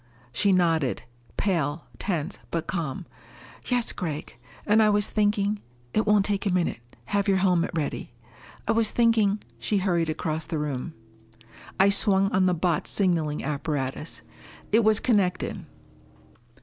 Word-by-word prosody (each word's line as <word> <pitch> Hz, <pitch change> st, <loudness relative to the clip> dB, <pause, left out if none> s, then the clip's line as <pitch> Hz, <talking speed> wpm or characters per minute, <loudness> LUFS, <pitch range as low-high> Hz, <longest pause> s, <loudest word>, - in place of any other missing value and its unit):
She 200 Hz, -, +2 dB
nodded. 165 Hz, -7 st, +2 dB, 0.3 s
Pale, 165 Hz, -5 st, 0 dB
tense, 175 Hz, -2 st, -2 dB
but 165 Hz, -1 st, -2 dB
calm. 165 Hz, -1 st, -3 dB, 0.6 s
"Yes, 245 Hz, -2 st, +1 dB
Gregg. 155 Hz, -5 st, -5 dB, 0.3 s
And 215 Hz, +1 st, +4 dB
I 215 Hz, -, +5 dB
was 205 Hz, -1 st, +3 dB
thinking 205 Hz, -1 st, 0 dB, 0.2 s
" 120 Hz, 0 st, -32 dB
"It 215 Hz, -, +1 dB
won't 210 Hz, -1 st, +4 dB
take 205 Hz, -1 st, -1 dB
a -, -, +2 dB
minute. 180 Hz, -9 st, 0 dB, 0.3 s
Have 200 Hz, -, 0 dB
your 195 Hz, -1 st, +4 dB
helmet 180 Hz, -2 st, +2 dB
ready." 150 Hz, -5 st, -3 dB, 0.6 s
"I -, -, +3 dB
was 225 Hz, -1 st, +3 dB
thinking 220 Hz, -3 st, +3 dB
" -, -, -31 dB
She 210 Hz, -, 0 dB
hurried 175 Hz, -4 st, +1 dB
across 155 Hz, 0 st, -2 dB
the 160 Hz, -, -3 dB
room. 150 Hz, +1 st, -3 dB, 0.8 s
I 195 Hz, +1 st, +6 dB
swung 195 Hz, -1 st, +3 dB
on 185 Hz, 0 st, +3 dB
the 180 Hz, -, +2 dB
Botz 170 Hz, -2 st, 0 dB
signaling 165 Hz, -6 st, 0 dB
apparatus. 140 Hz, -4 st, -3 dB, 0.5 s
It 225 Hz, +2 st, +5 dB
was 215 Hz, 0 st, +4 dB
connected. 200 Hz, -7 st, 0 dB
185 Hz, 150 wpm, -26 LUFS, 155-205 Hz, 0.8 s, I